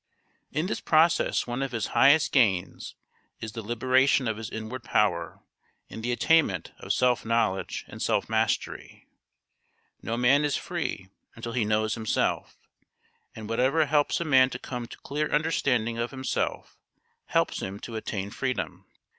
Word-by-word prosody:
In 155 +2 -1
this 190 - -2
process 160 +1 +3
one 120 +2 -3
of 135 -2 -3
his 115 -2 -1
highest 145 +3 +5
gains 100 -9 +1 0.4
is 110 - -6
the 115 - -6
liberation 130 +4 +2
of 110 -1 -1
his 110 -1 -6
inward 110 +3 -6
power 85 -8 0 0.5
and 110 - -7
the 120 +2 -2
attainment 120 - +2
of - - -4
self 125 -1 +2
knowledge 110 -5 -1
and - - -10
self - - +1
mastery. - - -2 1.0
No 115 - -3
man 130 +4 +4
is 145 -1 +1
free 165 - -4 0.3
until 115 0 -6
he 120 -3 +1
knows 110 +1 +1
himself, 110 -2 -1 0.8
and 110 -1 -8
whatever 130 +8 +2
helps 145 0 +1
a 170 - -2
man 130 -4 +5
to 125 - -5
come 125 -2 -6
to - - -11
clear 150 +2 -2
understanding 125 -7 +1
of 120 +1 -1
himself 130 -1 -3 0.5
helps - - +1
him 100 +2 -5
to 115 - -7
attain 100 -2 -4
freedom. 130 +1 -3
120 Hz, 155 wpm, -27 LUFS, 110-140 Hz, 1.0 s, highest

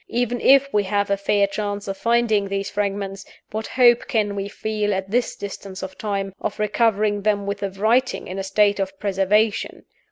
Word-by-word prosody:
Even 245 0 -1
if 275 0 +6
we 205 -1 +2
have 200 +1 0
a - - +4
fair 200 0 +2
chance 205 0 -4
of 195 - -3
finding 230 -2 +1
these 195 0 -3
fragments, 195 -1 -3 0.3
what 220 +1 -4
hope 240 -2 +4
can 215 -6 0
we 200 0 -3
feel, 210 -1 -2
at 190 0 -4
this 245 +2 0
distance 195 -1 -7
of 190 0 -6
time, 195 -2 -3
of 210 - -3
recovering 210 -1 +1
them 205 -1 +1
with 200 0 -3
the 200 - -2
writing 225 +7 +1
in 185 +2 -5
a - - -2
state 205 +1 +2
of 195 -1 -3
preservation? 205 +2 0
205 Hz, 190 wpm, -22 LUFS, 195-220 Hz, 0.3 s, if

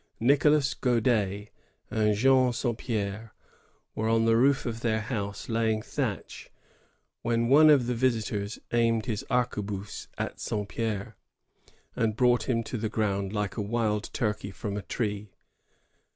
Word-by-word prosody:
Nicolas 140 +3 +3
God^ 110 -5 0 0.4
and 105 -1 +2
Jean 130 +2 +4
Saint 120 -1 -2
P^re 110 -1 -3 0.6
were 110 +1 -1
on 115 0 +3
the 115 0 +4
roof 135 +4 +3
of 115 -2 -3
their 110 -2 0
house, 100 -3 -4
laying 110 -1 0
thatch, - - -4 0.7
when 115 0 0
one 155 +3 +7
of 140 -5 +5
the 125 - -1
visitors 110 -4 -1 0.2
aimed 115 -2 +2
his 110 -4 -3
arquebuse 105 -5 -2
at - - -4
Saint 105 -2 -3
Pdre, 110 -4 -3 0.8
and 110 -2 0
brought 125 +1 +2
him 115 -2 +1
to 120 - -5
the 110 0 -2
ground 100 -3 -1
like 105 -3 -3
a - - 0
wild 105 0 -1
turkey 105 -5 -2
from 100 +1 -5
a 105 - -3
tree. 105 -2 -3
115 Hz, 145 wpm, -28 LUFS, 105-120 Hz, 0.8 s, one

